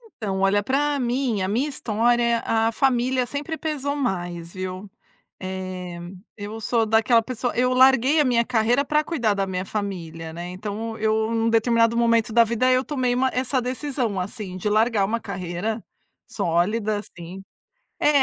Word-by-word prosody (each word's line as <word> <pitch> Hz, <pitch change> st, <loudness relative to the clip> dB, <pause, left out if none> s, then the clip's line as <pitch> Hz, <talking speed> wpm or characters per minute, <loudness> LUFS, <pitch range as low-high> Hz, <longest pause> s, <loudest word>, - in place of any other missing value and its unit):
Então 195 Hz, -4 st, -3 dB
olha 195 Hz, +1 st, +2 dB
pra 285 Hz, +4 st, +1 dB
mim, 245 Hz, -3 st, 0 dB
a 185 Hz, -, 0 dB
minha 235 Hz, +9 st, 0 dB
história, 235 Hz, -1 st, +1 dB
a 225 Hz, 0 st, +2 dB
família 255 Hz, 0 st, +1 dB
sempre 290 Hz, +5 st, -4 dB
pesou 290 Hz, -3 st, -2 dB
mais, 175 Hz, -10 st, -3 dB
viu. 185 Hz, +1 st, -6 dB, 0.5 s
Eh, 185 Hz, -2 st, -5 dB, 0.4 s
eu 210 Hz, +2 st, -7 dB
sou 225 Hz, +1 st, +1 dB
daquela 225 Hz, +2 st, +4 dB
pessoa 245 Hz, +1 st, -3 dB
eu 250 Hz, +1 st, +2 dB
larguei 265 Hz, +3 st, +5 dB
a -, -, +4 dB
minha 240 Hz, -3 st, +2 dB
carreira 240 Hz, +3 st, +2 dB
pra 300 Hz, +1 st, +2 dB
cuidar 240 Hz, -11 st, 0 dB
da 195 Hz, -1 st, -1 dB
minha 185 Hz, -1 st, -3 dB
família, 170 Hz, -6 st, -5 dB
né. 175 Hz, +2 st, -6 dB
Então 210 Hz, +4 st, -5 dB
eu 220 Hz, +1 st, +1 dB
num 230 Hz, 0 st, +1 dB
determinado 230 Hz, 0 st, +3 dB
momento 230 Hz, -1 st, +2 dB
da 235 Hz, +1 st, +6 dB
vida 235 Hz, +3 st, +1 dB
eu 255 Hz, +1 st, +2 dB
tomei 255 Hz, -4 st, 0 dB
uma 260 Hz, +1 st, +2 dB
essa 255 Hz, +1 st, 0 dB
decisão 250 Hz, -4 st, -2 dB
assim 185 Hz, 0 st, -6 dB
de 185 Hz, +3 st, -2 dB
largar 215 Hz, 0 st, +2 dB
uma 225 Hz, +4 st, -1 dB
carreira, 195 Hz, +2 st, -4 dB, 0.5 s
sólida 205 Hz, +6 st, 0 dB
assim. 180 Hz, -2 st, -9 dB, 0.6 s
É -, -, +3 dB
225 Hz, 160 wpm, -23 LUFS, 195-250 Hz, 0.6 s, da